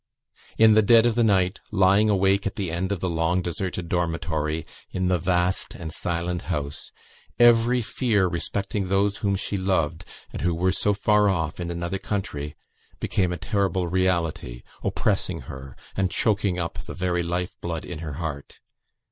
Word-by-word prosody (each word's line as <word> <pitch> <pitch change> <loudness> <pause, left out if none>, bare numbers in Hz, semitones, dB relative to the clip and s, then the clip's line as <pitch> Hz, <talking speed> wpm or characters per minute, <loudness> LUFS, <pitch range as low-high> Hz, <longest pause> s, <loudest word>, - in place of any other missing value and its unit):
In 110 -1 +7
the 110 - +6
dead 115 +2 +6
of 120 - +3
the 120 +1 +2
night, 95 -3 +2
lying 100 +1 +4
awake 100 0 +3
at 100 - -4
the 95 -5 -2
end 90 +3 -2
of 95 -4 -2
the 95 - 0
long 85 +1 +1
deserted 90 0 -3
dormitory, 80 -2 -1 0.2
in 95 0 -1
the 90 -1 +2
vast 90 +1 0
and 80 -3 -7
silent 85 +1 -2
house, 75 -4 -4 0.5
every 120 +1 +5
fear 105 -5 +1
respecting 95 +3 -2
those 100 +2 +1
whom 100 -2 0
she 100 +1 -2
loved, 90 -4 0 0.3
and - - -5
who 85 -1 +1
were 90 +2 +2
so 105 +2 +1
far 105 0 +3
off 80 -4 -1
in 85 -1 -3
another 85 +2 -3
country, 75 -9 -4 0.4
became 90 -2 0
a 90 - -2
terrible 95 -3 0
reality, 85 -9 -1 0.2
oppressing - - 0
her 65 -1 -9 0.2
and 95 -2 +1
choking 100 -2 +1
up 85 -2 -3
the - - -7
very 90 -1 0
life 90 +1 -2
blood 85 -2 -4
in 85 -3 -6
her 80 -2 -5
heart. 75 -2 -6
90 Hz, 170 wpm, -25 LUFS, 85-100 Hz, 0.5 s, In